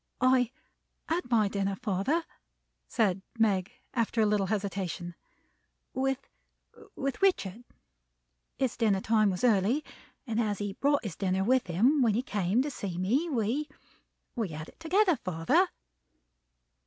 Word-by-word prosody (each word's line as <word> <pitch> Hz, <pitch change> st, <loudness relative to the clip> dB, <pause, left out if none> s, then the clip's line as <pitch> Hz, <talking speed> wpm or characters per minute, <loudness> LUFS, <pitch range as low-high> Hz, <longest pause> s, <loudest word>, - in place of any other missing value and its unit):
"I 255 Hz, -1 st, +4 dB, 0.6 s
had 330 Hz, -4 st, -1 dB
my 220 Hz, -4 st, +4 dB
dinner, 200 Hz, 0 st, -1 dB
father," 235 Hz, -, 0 dB, 0.6 s
said 195 Hz, -5 st, +1 dB, 0.2 s
Meg, 200 Hz, -4 st, +2 dB, 0.2 s
after 230 Hz, -2 st, 0 dB
a 220 Hz, -, +5 dB
little 205 Hz, -2 st, +2 dB
hesitation, 190 Hz, -4 st, -3 dB, 0.8 s
"with 270 Hz, 0 st, -1 dB, 0.7 s
with 275 Hz, +3 st, -3 dB
Richard. 240 Hz, -, +1 dB, 0.9 s
His 260 Hz, -3 st, 0 dB
dinner 215 Hz, -5 st, +2 dB
time 215 Hz, 0 st, +3 dB
was 185 Hz, +2 st, -3 dB
early; 230 Hz, +5 st, +3 dB, 0.4 s
and 230 Hz, -2 st, 0 dB
as 210 Hz, -3 st, -1 dB
he 205 Hz, 0 st, -3 dB
brought 285 Hz, +5 st, +1 dB
his 200 Hz, -8 st, -5 dB
dinner 190 Hz, +1 st, 0 dB
with 255 Hz, +2 st, +2 dB
him 240 Hz, -, +3 dB
when 225 Hz, -5 st, +3 dB
he 240 Hz, -, 0 dB
came 205 Hz, +1 st, +1 dB
to 295 Hz, -, -3 dB
see 190 Hz, -8 st, -5 dB
me, 250 Hz, -, +1 dB
we 260 Hz, +3 st, -1 dB, 0.7 s
we 225 Hz, -4 st, -1 dB
had 155 Hz, 0 st, -7 dB
it -, -, -20 dB
together, 360 Hz, +1 st, +3 dB
father." 165 Hz, -6 st, +2 dB
220 Hz, 140 wpm, -29 LUFS, 195-260 Hz, 0.9 s, a